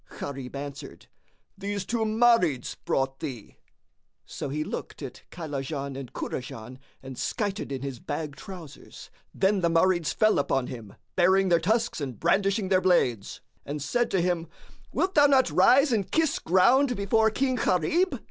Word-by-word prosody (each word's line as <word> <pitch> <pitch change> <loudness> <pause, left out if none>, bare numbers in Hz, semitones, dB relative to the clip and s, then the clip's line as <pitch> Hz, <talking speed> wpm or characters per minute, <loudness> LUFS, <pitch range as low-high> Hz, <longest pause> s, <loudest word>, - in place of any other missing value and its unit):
Gharib 135 -2 -6
answered, 140 0 -8 0.5
"These 200 -1 -4
two 225 +1 -1
Marids 215 - +2
brought 135 0 -1
thee." 130 -9 -7 0.7
So - - -6
he 150 +3 -2
looked 155 - -6
at 135 - -8
Kaylajan 140 -3 -5
and 135 -2 -7
Kurajan 125 0 -6 0.2
and 130 -1 -8
skited 205 - -2
in 135 -1 -4
his 135 -4 -5
bag 150 +2 -5
trousers. 175 -3 -11 0.2
Then 195 +1 +1
the 170 - +2
Marids 170 0 +2
fell 215 -6 +3
upon 135 -2 0
him, 115 -5 -9 0.2
baring 190 +1 +4
their 170 -1 +4
tusks 220 +2 0
and 130 -5 -5
brandishing 195 0 +1
their 185 -1 +3
blades, 125 - +1 0.2
and 145 +1 -5
said 235 - 0
to 190 - +1
him, 170 -1 -1 0.4
"Wilt 380 +1 0
thou 290 -1 +6
not 270 -2 +3
rise 275 +2 +5
and 210 -5 0
kiss 320 -2 +1
ground 245 - +3
before 220 +2 +2
King 260 +4 0
Gharib?" 265 - +1
180 Hz, 155 wpm, -27 LUFS, 140-220 Hz, 0.7 s, thou